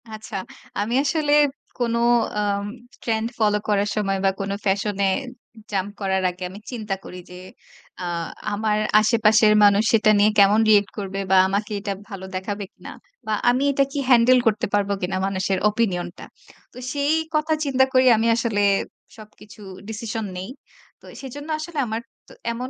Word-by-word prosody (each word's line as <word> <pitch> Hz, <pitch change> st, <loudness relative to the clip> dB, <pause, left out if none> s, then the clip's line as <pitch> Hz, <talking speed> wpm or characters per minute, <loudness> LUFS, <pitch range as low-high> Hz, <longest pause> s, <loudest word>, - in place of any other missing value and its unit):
আচ্ছা, 215 Hz, -1 st, -9 dB, 0.4 s
আমি 220 Hz, +4 st, -1 dB
আসলে 295 Hz, 0 st, 0 dB, 0.5 s
কোন 235 Hz, -2 st, -1 dB, 0.4 s
আম 200 Hz, -1 st, -1 dB, 0.4 s
ট্রেন্ড 225 Hz, -1 st, -1 dB
ফলো 210 Hz, -1 st, +3 dB
করার 205 Hz, 0 st, +1 dB
সময় 195 Hz, -2 st, 0 dB
বা 195 Hz, -, +5 dB
কোন 195 Hz, 0 st, -3 dB
ফ্যাশন 200 Hz, +1 st, 0 dB
এ -, -, +3 dB, 0.6 s
জাম্প 195 Hz, 0 st, -1 dB
করার 190 Hz, -1 st, 0 dB
আগে, 180 Hz, +1 st, -8 dB
আমি 200 Hz, +3 st, -10 dB
চিন্তা 215 Hz, -5 st, -3 dB
করি 180 Hz, -, -9 dB
যে 180 Hz, -, -11 dB, 0.7 s
আ -, -, -4 dB, 0.5 s
আমার 210 Hz, 0 st, 0 dB, 0.2 s
আশেপাশের 215 Hz, -1 st, +4 dB
মানুষ 205 Hz, +1 st, +5 dB
সেটা 215 Hz, -1 st, +5 dB
নিয়ে 210 Hz, +1 st, +5 dB
কেমন 200 Hz, +2 st, +6 dB
রিঅ্যাক্ট 205 Hz, -2 st, +4 dB
করবে। 195 Hz, -1 st, -4 dB
বা 190 Hz, -, +6 dB
আমাকে 205 Hz, +2 st, -2 dB
এটা 200 Hz, -1 st, -3 dB, 0.2 s
ভালো 195 Hz, -2 st, -7 dB
দেখাবে 200 Hz, +2 st, -4 dB
কিনা। -, -, -11 dB, 0.4 s
বা 215 Hz, -, 0 dB, 0.2 s
আমি 255 Hz, +3 st, +2 dB
এটা 275 Hz, 0 st, +2 dB
কি 285 Hz, -, -3 dB
হ্যান্ডেল 250 Hz, +1 st, +6 dB
করতে 210 Hz, -1 st, +1 dB
পারব 205 Hz, -1 st, +1 dB
কিনা 185 Hz, +1 st, -2 dB
মানুষের 190 Hz, 0 st, -1 dB
ওপিনিয়নটা। 185 Hz, -5 st, -2 dB, 0.5 s
তো -, -, -14 dB, 0.2 s
সেই 285 Hz, +2 st, +1 dB, 0.2 s
কথা 305 Hz, +1 st, +1 dB
চিন্তা 265 Hz, -1 st, +3 dB
করি 255 Hz, 0 st, +5 dB
আমি 225 Hz, +1 st, +1 dB
আসলে 230 Hz, -3 st, 0 dB, 0.6 s
সবকিছু 215 Hz, 0 st, -15 dB, 0.3 s
ডিসিশন 220 Hz, 0 st, -4 dB
নেই। 190 Hz, +5 st, -6 dB, 0.5 s
তো -, -, -18 dB, 0.2 s
সেজন্য 290 Hz, +4 st, -8 dB
আসলে 310 Hz, 0 st, -7 dB
আমার 220 Hz, +1 st, -3 dB, 0.3 s
তো -, -, -15 dB, 0.2 s
এমন 250 Hz, +2 st, -5 dB
210 Hz, 160 wpm, -22 LUFS, 200-235 Hz, 0.7 s, কেমন